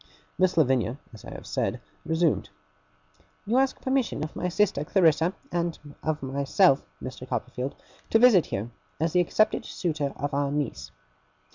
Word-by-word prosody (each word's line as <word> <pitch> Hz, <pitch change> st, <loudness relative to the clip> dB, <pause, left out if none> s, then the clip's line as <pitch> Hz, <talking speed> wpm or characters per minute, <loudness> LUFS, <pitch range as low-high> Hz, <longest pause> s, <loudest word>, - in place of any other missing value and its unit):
Miss 185 Hz, -2 st, +2 dB
Lavinia, 130 Hz, -4 st, +2 dB, 0.2 s
as 110 Hz, -, -12 dB
I -, -, -8 dB
have -, -, -9 dB
said, -, -, -1 dB, 0.3 s
resumed: 160 Hz, -1 st, +1 dB, 1.0 s
'You 230 Hz, +5 st, +1 dB
ask 270 Hz, 0 st, +1 dB
permission 260 Hz, -, 0 dB
of 155 Hz, -, -6 dB
my 180 Hz, -, -1 dB
sister 180 Hz, -6 st, +1 dB
Clarissa 165 Hz, 0 st, +3 dB, 0.2 s
and 170 Hz, -1 st, -1 dB, 0.5 s
myself, 140 Hz, +4 st, +3 dB, 0.2 s
Mr. 130 Hz, 0 st, -7 dB
Copperfield, 125 Hz, +2 st, -3 dB, 0.3 s
to -, -, +5 dB
visit 225 Hz, -7 st, +6 dB
here, 110 Hz, +5 st, -4 dB, 0.3 s
as 160 Hz, +1 st, 0 dB
the 180 Hz, -, +4 dB
accepted 215 Hz, +5 st, +2 dB
suitor 155 Hz, -5 st, -2 dB
of 145 Hz, +1 st, -3 dB
our 140 Hz, 0 st, 0 dB
niece. 120 Hz, -, -3 dB
155 Hz, 145 wpm, -27 LUFS, 135-185 Hz, 1.0 s, visit